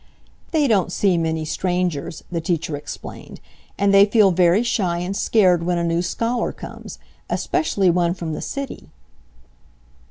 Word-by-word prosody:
"They 305 -3 +2
don't 195 -6 +2
see 190 -1 +2
many 160 -1 -1
strangers," 175 -3 -2
the 170 -1 -2
teacher 165 -2 -2
explained, 145 - -9 0.4
"and 200 0 +2
they 195 +1 +7
feel 205 -2 +4
very 180 +4 +3
shy 185 -7 0
and 180 +3 -3
scared 185 -6 +3
when 175 +1 0
a 170 - -1
new 170 0 +1
scholar 230 +7 -1
comes, - - -10 0.3
especially 195 - +1
one 175 0 +1
from 165 -3 -5
the - - -5
city." 275 -1 -6
180 Hz, 150 wpm, -21 LUFS, 170-200 Hz, 0.4 s, they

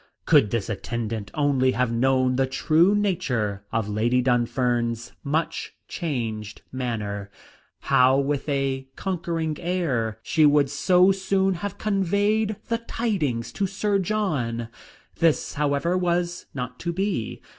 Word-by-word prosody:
Could 105 - +5
this 115 -2 -1
attendant 110 -1 -4
only 135 -3 +2
have 125 -2 0
known 130 +1 +2
the 135 0 +2
true 160 +8 +3
nature 125 - -1
of 110 -2 -1
Lady 115 +4 +1
Dunfern's 120 -1 0
much 155 +3 -2
changed 115 - -4
manner, 105 -6 -3 0.5
how, 130 +1 +4
with 140 +1 -1
a 135 -1 -1
conquering 165 -4 -2
air, 140 - -1
she 155 +6 +2
would 145 -2 +4
so 185 +1 +4
soon 195 0 +1
have 195 +3 -5
conveyed 205 +2 +1
the 230 0 0
tidings 155 - -2
to 195 - 0
Sir 200 +1 0
John. 145 - -1 0.5
This, 165 -3 +2
however, 145 +4 0
was 175 -1 -1
not 125 -1 -5
to 170 - -2
be. 185 - -2
140 Hz, 125 wpm, -24 LUFS, 120-180 Hz, 0.5 s, Could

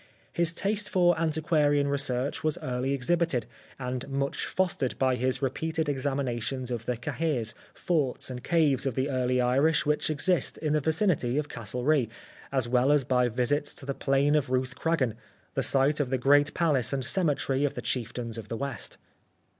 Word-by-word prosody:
His 170 -1 +1
taste 205 +4 -1
for 175 -2 +4
antiquarian 155 -3 +2
research 140 -1 -1
was 155 -1 +1
early 125 +1 -1
exhibited, 140 -2 +1 0.3
and 125 0 -4
much 140 0 -2
fostered 175 -9 -1
by 130 -1 +2
his 130 +3 -1
repeated 160 +4 -1
examinations 130 -2 -2
of 115 -2 -4
the 125 - -1
cahirs, 120 -3 -2 0.2
forts 145 -7 0
and 125 0 -7
caves 150 -5 +2
of 130 - -2
the 135 +2 0
early 125 -1 +1
Irish 135 +6 +3
which 150 +1 +1
exist 155 +1 +1
in 150 -1 -1
the 150 - +2
vicinity 160 - +1
of 150 -1 -1
Castlerea, 125 +4 0 0.4
as 130 -3 0
well 125 +3 +3
as 145 -2 +4
by 125 -1 +2
visits 130 +5 0
to - - -8
the 140 - -2
plain 135 +2 +2
of 150 -4 +1
Ruthcragan, 130 -1 0 0.4
the - - 0
site 140 +2 +2
of 140 -4 0
the 130 - +1
great 145 +3 +3
palace 145 -8 +2
and 135 -2 -1
cemetery 145 -5 +1
of 145 - 0
the - - -4
chieftains 115 -1 -3
of 110 - -9
the 115 - -4
West. 140 -1 -4
135 Hz, 170 wpm, -28 LUFS, 125-150 Hz, 0.4 s, for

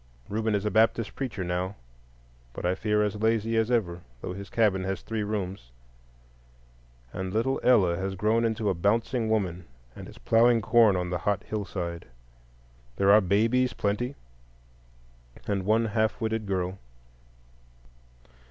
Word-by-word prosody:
Reuben 110 +1 0
is 100 0 -2
a 105 - 0
Baptist 115 0 +2
preacher 125 -8 -4
now, 90 +2 -2 0.8
but - - -6
I 90 - +2
fear 105 +2 +1
as 105 0 -2
lazy 115 0 +1
as 110 0 +1
ever, 90 -8 0 0.2
though 90 - -5
his 100 +1 -8
cabin 105 -5 +2
has 95 0 -3
three 110 -1 -3
rooms; 95 - -4 1.4
and 95 -1 -4
little 115 +6 0
Ella 95 -9 +4
has 95 +1 -3
grown 110 +4 +1
into 110 -2 -1
a 100 - +2
bouncing 110 +6 0
woman, 90 -5 -1 0.3
and - - -9
is - - -14
ploughing 115 +1 +4
corn 115 -2 +4
on 90 -1 -2
the 90 - -1
hot 100 +2 -1
hillside. 90 -5 -5 0.9
There 100 0 +3
are 105 +1 +7
babies 115 +7 +2
a - - -26
plenty, 120 +7 -2 1.3
and 100 -2 -2
one 110 +2 +3
half 110 +1 0
witted 110 -2 -2
girl. 95 0 -2
105 Hz, 150 wpm, -27 LUFS, 95-115 Hz, 1.4 s, are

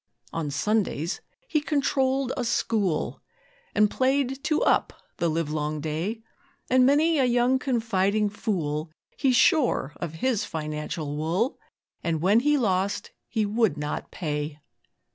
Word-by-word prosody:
On 160 -3 -2
Sundays 175 +1 0 0.3
he 305 -8 +1
controlled 270 -3 +1
a 250 - -2
'school', 220 -7 0 0.5
And 210 - +5
played 270 +1 +1
'two 305 +1 +1
up' - - +2 0.2
the 170 - +1
livelong 155 -1 -1
day; 165 +9 -3 0.5
And 255 0 +6
many 305 +3 +4
a 265 - +4
young 245 +1 +3
confiding 215 -5 +1
fool 160 -7 -2 0.3
He 270 -3 +2
shore 245 - +3
of 165 -2 -5
his 220 +3 0
financial 150 -3 -4
wool; 165 - -1 0.4
And 165 -2 0
when 195 +7 +4
he 295 +4 +3
lost 200 -4 0 0.2
he 220 -2 0
would 210 -6 +1
not 150 0 -4
pay. 150 -3 -3
210 Hz, 130 wpm, -26 LUFS, 160-255 Hz, 0.5 s, And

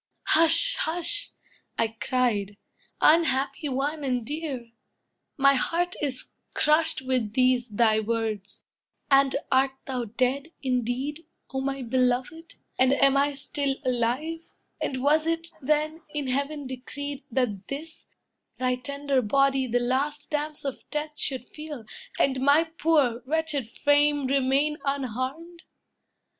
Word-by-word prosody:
—"Hush, 330 +10 +6
hush!" 350 +5 0 0.5
I 225 - +1
cried, 220 -3 -1 0.4
"Unhappy 295 -2 +3
one, 285 +3 -2
and 250 -4 -1
dear! 280 -5 -5 0.7
My 275 0 +5
heart 340 +6 0
is 270 -3 -1 0.2
crushed 305 -2 +3
With 255 -5 0
these 255 -1 +2
thy 220 0 +3
words! 220 -3 -3 0.5
And 275 0 +5 0.2
art 265 +1 +3
thou 255 -3 -3
dead, 255 +6 -1 0.2
indeed, 260 +5 -2 0.3
O 265 - -1
my 270 0 -3
beloved? 255 +6 -1 0.2
and 260 +1 +5
am 275 0 +4
I 285 +1 +2
still 280 0 -1
alive? 255 +7 -1 0.3
And 260 -1 -2
was 305 +3 +3
it, 330 0 -1
then, 305 +3 0
in 295 -1 -1
heaven 280 +3 -2
decreed, 280 +2 -6
that 225 -6 -1
this, 315 +3 -7 0.5
Thy 255 0 0
tender 280 +1 -1
body 270 +3 +2
the 245 +1 +1
last 280 +5 -1
damps 300 0 -2
of 275 - -3
death 300 0 -4
Should 260 -3 -2
feel, 300 -6 -9 0.3
and 265 -1 +1
my 285 +4 +5
poor, 310 -7 +1
wretched 305 -5 -1
frame 290 +1 +2
remain 275 +3 +1
Unharmed? 275 +5 -3
275 Hz, 125 wpm, -26 LUFS, 255-300 Hz, 0.7 s, Hush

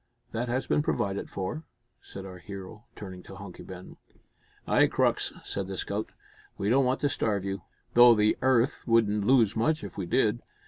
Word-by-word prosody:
"That 120 +2 -2
has 130 +2 -1
been - - +2
provided 100 -8 -1
for," 100 +12 -4 0.4
said 95 0 -9
our 90 -1 -9
hero, 100 +4 -9
turning 95 -3 -8
to 95 - -12
Hunky 95 -2 -10
Ben. 90 -1 -10 0.7
"Ay, - - +4
Crux," - - +1
said 100 -1 -4
the 95 -1 -5
scout, 100 +4 -3 0.5
"we 100 - -1
don't 135 +3 +4
want 130 +1 0
to 145 - +3
starve 105 -8 -1
you, 100 0 -3 0.3
though 120 0 +8
the 105 0 +3
'arth 130 +1 +2
wouldn't 105 -3 +3
lose 115 -5 +4
much 150 +8 +1
if - - -7
we 90 - -3
did. 110 +2 +2
105 Hz, 180 wpm, -28 LUFS, 95-120 Hz, 0.7 s, though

